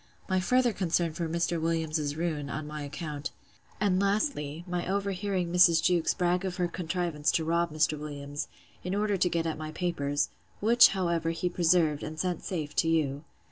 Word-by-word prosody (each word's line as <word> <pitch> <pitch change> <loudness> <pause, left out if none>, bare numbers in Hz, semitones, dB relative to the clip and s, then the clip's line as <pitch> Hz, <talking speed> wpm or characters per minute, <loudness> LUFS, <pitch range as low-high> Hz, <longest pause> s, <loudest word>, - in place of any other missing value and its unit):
My 185 -1 +2
further 250 +4 +2
concern 170 -3 0
for 165 0 -3
Mr. 170 0 0
Williams's 160 -3 -1
ruin, 155 -3 -2
on 155 +1 -4
my 150 0 -6
account: 150 +1 -5 0.5
And, 195 -2 +2
lastly, 195 - 0
my 175 -1 -2
over 200 0 0
hearing 185 -3 -2
Mrs. 175 -2 +6
Jewkes 175 -2 +2
brag 180 0 +1
of 185 -2 -3
her 180 -1 +1
contrivance 170 -3 -1
to 160 - +1
rob 170 +1 +1
Mr. 155 0 +1
Williams, 145 -1 -5 0.4
in 180 +2 -2
order 205 0 +1
to 180 -1 +2
get 165 -1 -1
at 160 -1 -2
my 155 0 -5
papers; 145 -4 -1 0.3
which, 235 +3 +7
however, 170 -3 0
he 165 +2 -1
preserved, 165 -4 +2
and 155 +1 -6
sent 180 +1 -1
safe 155 -5 -4
to 165 - +3
you. 150 -2 0
170 Hz, 180 wpm, -29 LUFS, 155-180 Hz, 0.5 s, which